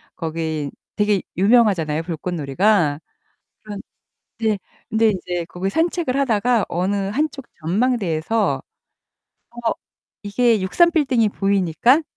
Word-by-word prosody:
거기 160 -3 -3 0.2
되게 210 -2 +2 0.2
유명하잖아요, 190 -7 +3
불꽃놀이가. 165 0 0 0.6
그런 205 -2 -7 0.6
네. 220 -3 +1 0.3
근데 225 0 +3
이제 180 -3 -3
거기 185 +2 -3
산책을 325 - 0
하다가 240 -3 +2
어느 185 +4 -1
한 295 +10 +1
쪽 275 -3 -10 0.2
전망대에서 205 0 0 0.9
어 235 -1 -2 0.5
이게 225 +2 +2
63빌딩이 275 - +3
보이니까 200 - +2
205 Hz, 240 characters per minute, -21 LUFS, 175-240 Hz, 0.9 s, 유명하잖아요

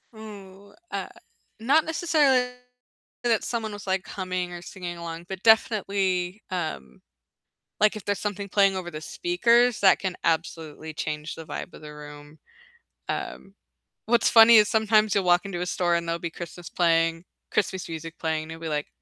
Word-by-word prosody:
Ooh, 200 -2 -12 0.2
uh, - - -3 0.5
not 280 +8 +3
necessarily 290 -6 +2 0.7
that 235 -3 +2
someone 225 -3 -3
was, 205 -1 -9
like, 190 0 -1
humming, 185 -2 -4
or 175 - -7
singing 175 -1 -7
along, 170 0 -7
but 190 0 -6
definitely, 200 -4 +2
um, 75 - -5 0.8
like, 215 0 +4
if 210 - -8
there's 205 -2 -1
something 205 -1 -4
playing 195 -1 +3
over 180 -2 -5
the 155 -2 -7
speakers, 245 - +2
that 190 -2 +6
can 190 -2 -3
absolutely 160 -1 -2
change 150 0 -4
the 160 - -10
vibe 145 - -6
of - - -11
the 150 0 -9
room. 150 0 -12 0.7
Um, 355 - -5 0.5
what's 235 0 +3
funny 230 0 +8
is 210 -1 +5
sometimes 215 -1 +3
you'll 200 - +2
walk 175 +2 +4
into 180 -3 -4
a - - -1
store 175 -2 +1
and 170 0 -2
there'll 165 0 -1
be 170 - -4
Christmas 170 0 -8
playing 165 0 +1 0.3
Christmas 190 -2 -1
music 165 0 -7
playing, 160 -1 -1
and 160 - -10
you'll 165 - -12
be 165 - -4
like, 150 -1 -2
185 Hz, 170 wpm, -25 LUFS, 165-215 Hz, 0.8 s, funny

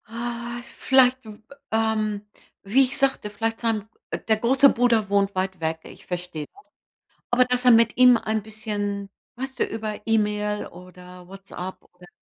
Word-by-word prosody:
Ah 235 +1 -5 0.2
vielleicht, 260 -1 +4
w 215 -1 -10 0.3
ähm, 215 -2 0 0.4
wie 225 +7 +4
ich 260 +1 -2
sagte, 270 -6 +1
vielleicht 225 +2 -3
sein 220 -3 -1 0.4
der 220 -1 +3
große 265 +5 +4
Bruder 230 -4 +2
wohnt 200 -1 +1
weit 190 -1 -2
weg. 160 0 -1
Ich - - -14
verstehe 180 -4 -5
das. 405 - -19 0.7
Aber 250 +1 +4
dass 250 0 0
er 250 - +7
mit 230 -1 +5
ihm 250 -1 +7
ein 220 -1 -2
bisschen, 205 -2 -4 0.3
weißt 265 +1 -6
du, - - +2
über 215 -1 -5
E-Mail 210 -1 0
oder 180 0 -13
Whatsapp 190 -1 -9
oder? 180 0 -17
220 Hz, 155 wpm, -24 LUFS, 200-240 Hz, 0.7 s, er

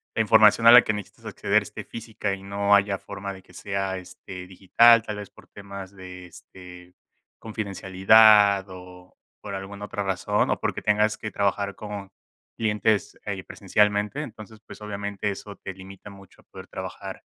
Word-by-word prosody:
la - - +2
información 115 - +5
a - - +11
la 125 0 +9
que 110 - -1
necesitas 105 -2 -9
acceder - - +1
esté - - -9
física 110 -3 -5
y 95 - -14
no 100 +1 +2
haya 100 -1 +1
forma 100 0 -7
de 95 - -13
que 90 - -21
sea, 95 0 -3
este, 90 0 -10
digital, 115 +5 +5
tal 105 -1 -5
vez 105 -1 -8
por - - -19
temas 100 -1 -10
de, 90 -1 -10
este, 90 0 -14 0.5
confidencialidad 100 -1 +4
o 90 0 -13 0.3
por 100 - -7
alguna 100 +1 -7
otra 105 -1 -5
razón 95 -2 0
o - - -1
porque - - -3
tengas 105 +1 +1
que 105 - -5
trabajar 100 0 -1
con 100 -2 -8 0.4
clientes 105 -1 0
ahí 100 -2 -4
presencialmente, 105 +7 0
entonces, 110 -5 -10
pues, - - -13
obviamente, 100 0 -4
eso 100 +1 -9
te 95 - -8
limita 95 +1 -12
mucho 100 -1 -17
a - - -30
poder - - -12
trabajar - - -8
100 Hz, 170 wpm, -24 LUFS, 95-105 Hz, 0.5 s, a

